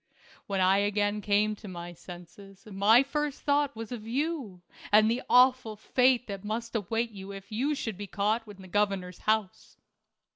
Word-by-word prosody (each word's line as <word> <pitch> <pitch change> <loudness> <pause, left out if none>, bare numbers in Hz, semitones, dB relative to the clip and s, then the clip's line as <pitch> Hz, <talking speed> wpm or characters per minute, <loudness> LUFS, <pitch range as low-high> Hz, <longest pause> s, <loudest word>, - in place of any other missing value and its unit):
When 195 -1 -1
I 190 +2 +4
again 205 +1 0
came 210 +1 +1
to 210 - -11
my 175 -1 -7
senses 180 +3 -13
my 215 +4 +4
first 295 +1 -3
thought 285 -2 +1
was 225 +1 -7
of 225 -3 -7
you 255 - -3 0.3
and 215 +1 +6
the 245 +2 -1
awful 250 -3 +4
fate 250 +3 +2
that 200 -2 -7
must 230 +2 -4
await 225 +3 -1
you 195 -1 -9
if 195 +1 -10
you 270 +8 0
should 220 -7 -5
be 205 - -5
caught 215 +4 -1
in 200 -2 -12
the - - -11
governor's 195 -2 -1
house. 215 -3 -2
210 Hz, 175 wpm, -28 LUFS, 195-235 Hz, 0.3 s, and